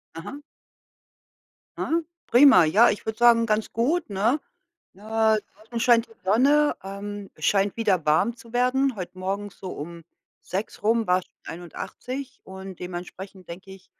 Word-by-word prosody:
Aha. 265 - -8 1.4
Ah, 330 +1 0 0.3
prima, 245 - +7
ja, 210 +10 +5
ich - - -3
würde 220 0 -4
sagen, 235 -1 +5
ganz 215 -1 -1
gut, 280 +9 0
ne? 215 +8 +1 0.5
Äh, 190 - -21 0.6
draußen 220 +3 -7
scheint 235 -1 +4
die - - -23
Sonne, 280 +9 +4
ähm, 200 +1 -7
scheint 200 +1 +1
wieder 195 -8 +1
warm 155 +10 +2
zu 230 -1 -16
werden. 255 +1 +2
Heute 185 -2 -7
morgens 195 +2 -4
so 190 - -7
um 170 +3 -8 0.4
6 195 +3 -5
rum 225 +1 +2
war's 180 0 +2
schon - - -36 0.2
81 250 - -7
und 190 -1 -10
dementsprechend 180 +1 -8
denke 185 +3 -10
ich 190 -1 -14
205 Hz, 145 wpm, -25 LUFS, 185-240 Hz, 1.4 s, prima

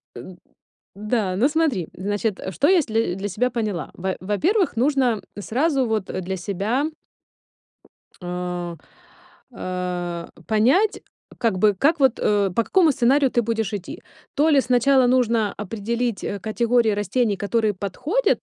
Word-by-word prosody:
Эн 175 +10 -10 0.6
да, 210 -2 -1
ну, 240 +7 +4
смотри, 295 - 0
значит, 205 +1 -2
что 190 - +1
если 225 - +2
для 195 +2 -4
себя 210 +6 0
поняла. 215 -7 -3
Во 190 +1 -3
во-первых, 315 - 0
нужно 250 -3 +1 0.2
сразу 265 +4 0
вот 220 -3 -1
для 185 +1 -4
себя 205 - -1 1.4
э, 180 -1 -4 0.8
э, 180 -2 -4 0.2
понять, 260 - +2 0.4
как 225 -5 0
бы, 210 +1 +4
как 300 - +2
вот, 265 -3 +3
э, 200 -2 +2
по 230 - +3
какому 340 - +3
сценарию 265 +1 +3
ты 240 - +2
будешь 225 -2 -2
идти. 195 -3 -6 0.3
То 305 +2 +3
ли 285 -3 +5
сначала 255 +1 +3
нужно 235 -4 +2
определить, 225 +3 -3
э, 200 - -3
категории 230 +3 +1
растений, 205 +1 0
которые 215 +1 0
подходят, 285 - 0
220 Hz, 135 wpm, -22 LUFS, 195-255 Hz, 1.4 s, ли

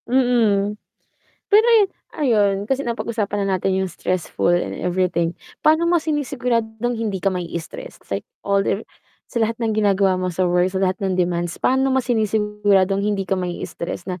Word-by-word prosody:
Mm, 230 -6 +2 0.8
pero 435 +2 +6
yu - - +5 0.3
ayun, 205 -7 +2
kasi 270 +1 0
napag-usapan 220 -3 -2
na 195 -1 +1
natin 190 +1 -1
yung 190 - -1
stressful 175 0 -1
and 175 - 0
everything, 175 -2 0 0.3
paano 315 +2 +4
mo 350 - +4
sinisiguradong 245 -7 -1
hindi 215 -4 -2
ka 195 - +3
mai 180 -2 -3
stress - - -8 0.2
like - - -2 0.2
older 200 +1 +1 0.4
sa 235 - -3
lahat 225 +1 0
ng 225 -2 0
ginagawa 200 -2 +3
mo 185 - -1
sa 185 +2 0
work, 180 +1 +2
sa 190 - -2
lahat 190 0 0
ng 190 -2 0
demands, 175 -1 0
paano 265 +1 +2
mo 265 - +3
sinisiguradong 210 -4 +1
hindi 205 -1 0
ka 195 - +1
mai 180 -1 -3
stress 170 +1 -6
na 185 -1 -4
205 Hz, 170 wpm, -21 LUFS, 185-235 Hz, 0.8 s, pero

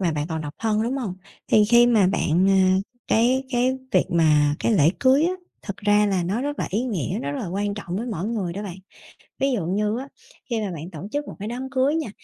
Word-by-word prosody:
mà 175 -4 +1
bạn 150 -1 -2
còn 160 -1 -3
độc 150 0 -6
thân, 220 -1 +1
đúng 245 +4 -1
hông? 225 -9 -3 0.3
Thì 215 - +5
khi 240 +3 +6
mà 220 -6 +4
bạn, 180 0 +2
à, 190 -1 +4 0.3
cái 250 +4 +2
cái 250 +1 +1 0.2
việc - - +4
mà 150 -4 +3
cái - - +1
lễ 160 -6 +5
cưới 270 +2 +4
á, 350 - +1 0.3
thực 200 - -6
ra 205 0 +3
là 190 -3 +1
nó 195 +7 -1
rất 290 +1 -3
là - - -1
ý 210 +5 0
nghĩa, 185 - -2
nó 140 +1 -3
rất 145 - -4
là - - -4
quan 200 +3 -2
trọng 195 -3 -5
với 230 +5 -3
mỗi 200 -5 -3
người 210 -6 -2
đó 200 +4 -5
bạn. 190 -4 -6 0.6
Ví 275 0 +2
dụ 210 -10 -1
như 210 +5 0
á, 270 - -7 0.4
khi 230 -2 -1
mà 205 -3 -3
bạn 165 +1 -7
tổ 160 - -8
chức 290 0 -3
một - - -8
cái 205 - -5
đám 250 +3 -5
cưới 265 +3 +2
nha, 320 -8 -2
205 Hz, 255 wpm, -23 LUFS, 180-245 Hz, 0.6 s, khi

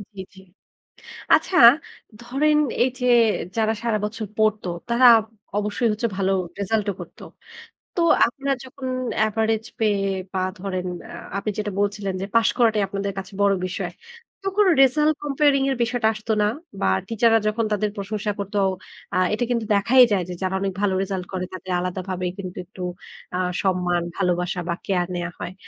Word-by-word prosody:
জি, 190 - -10 0.2
জি। - - -13 1.0
আচ্ছা 370 - +1 0.6
ধরেন 280 +6 +1 0.3
এইযে 250 0 -1 0.5
যারা 220 0 +2
সারাবছর 215 -1 -2
পড়তো 215 -3 +1 0.2
তারা 240 +2 +5 0.5
অবশ্যই 210 +3 0
হচ্ছে 215 +3 -1
ভালো 195 0 +1 0.3
রেজাল্টও 205 0 0
করতো। - - -11 0.7
তো 355 - -1 0.3
আপনারা 275 +3 -2
যখন 260 0 -7 0.4
এভারেজ 220 0 0
পেয়ে 210 -3 +2 0.3
বা 190 - -1 0.2
ধরেন 185 -1 -3 0.2
আ - - -9 0.2
আপনি 205 +2 -2
যেটা 210 -1 -2
বলছিলেন 200 -1 -1
যে, 195 - -3
"পাস 230 -1 +5
করাটাই 220 -3 +3
আপনাদের 200 0 -3
কাছে 195 +1 -7
বড় 200 0 +4
বিষয়।" 185 - -4 0.5
তো 390 - -10
কোনো 410 -3 +5
রেজাল্ট 300 +4 +4
comparing 280 -1 +2
এর 265 - -1
বিষয়টা 235 -1 +1
আসতো 215 +1 -3
না? 210 - +3 0.3
বা - - +1 0.2
টিচাররা 225 0 +3
যখন 225 +2 0
তাদের 210 0 0
প্রশংসা 210 +1 -3
করতো 200 +1 -3 0.6
আ - - 0 0.2
এটা 245 - 0
কিন্তু 235 -2 0
দেখাই 240 +6 +5
যায় 190 -3 +2
যে, 180 - -5
যারা 185 0 -1
অনেক 195 -1 -1
ভালো 200 -2 +1
রেজাল্ট 190 -2 -3 0.3
তাদের 185 0 -6
আলাদাভাবে 185 0 -3
কিন্তু 185 -2 -6
একটু 185 +1 -11 0.5
আ - - 0 0.2
সম্মান, 180 -2 +1
ভালোবাসা 180 -1 0
বা 170 - 0
কেয়ার 180 -3 +1
নেয়া 175 0 -3
হয়। 175 +1 -5
210 Hz, 155 wpm, -23 LUFS, 190-235 Hz, 1.0 s, তারা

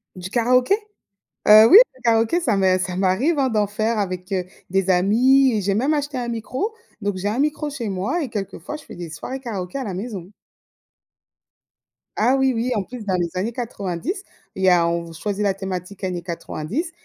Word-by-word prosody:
Du 185 0 -7
karaoké? 250 - +3 0.7
Heu, 215 +1 +9
oui, 390 - +10 0.2
le 255 - -20
karaoké 230 +7 +2
ça 240 -11 +1
m'est 190 -1 +3
ça 180 -1 -3
m'arrive, 200 - +1
hein, 265 -2 +2
d'en 210 -2 +1
faire 215 +2 -1
avec, 185 -1 -4
heu, 185 -2 -1 0.2
des 195 0 0
amis 245 +9 +4
et 210 - 0
j'ai 195 +1 0
même 265 +9 +1
acheté 290 -2 -2
un 240 -1 -3
micro, 255 - -3 0.3
donc 200 -2 -2
j'ai 190 +2 -2
un 215 +5 -1
micro 300 +1 0
chez 240 -6 -4
moi 210 - -1
et 260 - -5
quelquefois 205 - -5
je 300 - -14
fais - - -11
des 175 -2 -7
soirées 260 +11 -6
karaoké 205 -4 -5
à 265 - -3
la 200 - -4
maison. 195 -2 -6 1.9
Ah 245 +5 +3
oui, 265 -1 +2
oui, 240 +2 -1
en 205 - 0
plus 245 +1 -9
dans 190 -2 0
les 175 -1 0
années 210 +6 -2
90, 230 - -4 0.3
il 190 - -5
y 190 - +6
a 170 -2 +4
on 170 0 -1
v 165 - -11
choisit 205 +5 -3
la 200 -2 +1
thématique 190 0 -6
années 180 -2 -2
90 185 - -4
210 Hz, 205 wpm, -22 LUFS, 185-255 Hz, 1.9 s, oui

